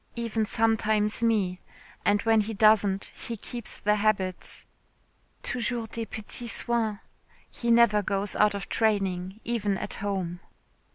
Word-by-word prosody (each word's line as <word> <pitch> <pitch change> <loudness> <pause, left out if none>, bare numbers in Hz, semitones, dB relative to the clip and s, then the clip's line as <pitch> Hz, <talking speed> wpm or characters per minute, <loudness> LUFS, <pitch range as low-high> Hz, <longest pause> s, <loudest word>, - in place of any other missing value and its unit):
Even 225 -2 -1
sometimes 220 -1 +1
me. 205 -6 +1 0.4
And 205 0 +2
when 225 -1 +4
he 215 +1 -4
doesn't, 205 -2 +3
he 230 - -6
keeps 235 +2 -6
the 210 +1 +2
habits. 200 -3 0 0.8
Toujours 235 -2 -1
des 230 0 -5
petits 225 +3 -4
soins. 225 -3 0 0.5
He 235 - -3
never 230 -3 +5
goes 200 0 -2
out 210 -1 +3
of 200 - -5
training, 195 -2 0
even 210 -4 -1
at - - -2
home." 190 -4 -2
215 Hz, 130 wpm, -27 LUFS, 200-225 Hz, 0.8 s, never